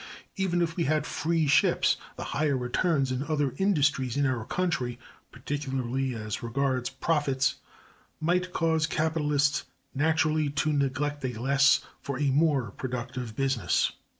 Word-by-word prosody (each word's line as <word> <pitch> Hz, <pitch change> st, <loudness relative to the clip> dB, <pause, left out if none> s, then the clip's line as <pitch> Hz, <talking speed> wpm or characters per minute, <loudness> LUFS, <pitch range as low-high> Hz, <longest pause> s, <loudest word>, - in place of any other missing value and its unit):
Even 175 Hz, -3 st, +1 dB
if 165 Hz, -1 st, -2 dB
we 170 Hz, -, 0 dB
had 155 Hz, +1 st, +1 dB
"free 165 Hz, 0 st, 0 dB
ships," 145 Hz, -, +3 dB, 0.2 s
the -, -, -6 dB
higher 145 Hz, -2 st, +1 dB
returns 135 Hz, +2 st, 0 dB
in 130 Hz, 0 st, -1 dB
other 145 Hz, -3 st, 0 dB
industries 145 Hz, -, +1 dB
in 145 Hz, -, +2 dB
our 125 Hz, -5 st, -1 dB
country, 170 Hz, -10 st, -1 dB, 0.3 s
particularly 135 Hz, -2 st, -3 dB
as 105 Hz, -2 st, -4 dB
regards 130 Hz, +1 st, -1 dB
profits, 140 Hz, -2 st, 0 dB, 0.6 s
might 180 Hz, +3 st, 0 dB
cause 160 Hz, -2 st, +1 dB
capitalists 150 Hz, -2 st, +1 dB, 0.3 s
naturally 155 Hz, +1 st, +2 dB
to 150 Hz, +2 st, 0 dB
neglect 145 Hz, +1 st, -1 dB
a 125 Hz, -4 st, -3 dB
less 135 Hz, +2 st, +4 dB, 0.2 s
for 140 Hz, -2 st, -4 dB
a 140 Hz, 0 st, +1 dB
more 140 Hz, -6 st, +2 dB
productive 125 Hz, -1 st, -5 dB
business. 130 Hz, -9 st, +1 dB
140 Hz, 135 wpm, -28 LUFS, 130-155 Hz, 0.6 s, less